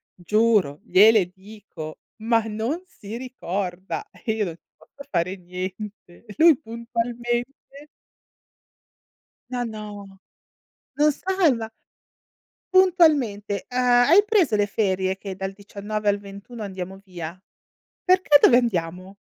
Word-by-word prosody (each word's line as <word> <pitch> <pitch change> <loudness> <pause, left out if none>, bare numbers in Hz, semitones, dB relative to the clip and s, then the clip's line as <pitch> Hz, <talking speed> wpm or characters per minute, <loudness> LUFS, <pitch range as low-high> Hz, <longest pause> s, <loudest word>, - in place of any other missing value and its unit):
giuro, 205 -4 +2
gliele 215 -3 +5
dico, 190 -5 -10 0.2
ma 225 0 +2
non 225 +11 -3
si 220 - -9
ricorda 195 - -5
e 225 - -4
io 215 -2 -1
non 165 - -5
ci - - -33
posso 280 - -15
fare 180 +1 0
niente. 185 +2 -8
E 210 - -11
lui 325 -3 +6
puntualmente 235 +1 -3 2.0
Ma 245 -1 -2
no. 205 -3 -9 0.8
No 300 +1 +4
salva! 300 - 0 1.0
Puntualmente, 295 - +3
ehm: 250 0 -3 0.3
"Hai 370 +7 +7
preso 385 - +2
le 205 -1 +2
ferie 190 -2 -1
che 195 -1 -7
dal 190 +1 -4
19 205 +1 -6
al 205 0 +3
21 200 +3 -10
andiamo 190 -1 -7
via?", 175 -2 -7 0.7
"Perché 365 -5 +5
dove 245 - +6
andiamo?". 185 -4 -2
210 Hz, 115 wpm, -23 LUFS, 190-245 Hz, 2.0 s, Hai